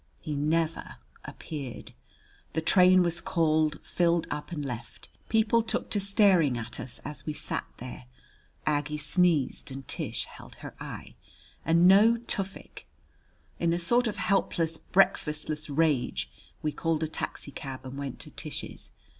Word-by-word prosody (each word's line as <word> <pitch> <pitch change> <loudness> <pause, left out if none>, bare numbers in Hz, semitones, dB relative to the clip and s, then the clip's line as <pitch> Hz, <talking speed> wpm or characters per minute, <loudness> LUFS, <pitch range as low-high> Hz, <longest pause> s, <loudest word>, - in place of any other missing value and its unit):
He 155 - -4
never 155 +3 0 0.3
appeared! 140 -6 -7 0.6
The 160 - 0
train 185 +2 +6
was 170 -1 +1
called, 155 -2 +2
filled 170 -1 +2
up, 150 +2 -4
and 150 -4 -3
left. 120 -4 -7 0.2
People 225 +1 +4
took 225 - -2
to 205 - +2
staring 195 - +4
at 120 0 -5
us 125 - -5
as 150 +1 -7
we 155 - -1
sat - - -3
there. 125 0 -8 0.6
Aggie 150 0 0
sneezed 155 -2 +2
and 135 0 -8
Tish - - -2
held - - -13
her - - -9
eye. - - -8 0.5
And 170 +2 +5
no 210 +5 +7
Tufik! 195 -4 -4 0.7
In 170 0 +2
a 170 - 0
sort 240 +8 +3
of 210 - -3
helpless, 165 -4 +1
breakfastless 155 -5 +1
rage 140 - +1 0.3
we 155 - +1
called 160 +1 -1
a - - 0
taxicab 135 -3 -5
and 130 +1 -7
went 140 -2 -5
to - - -8
Tish's. - - -6
160 Hz, 145 wpm, -28 LUFS, 145-180 Hz, 0.7 s, no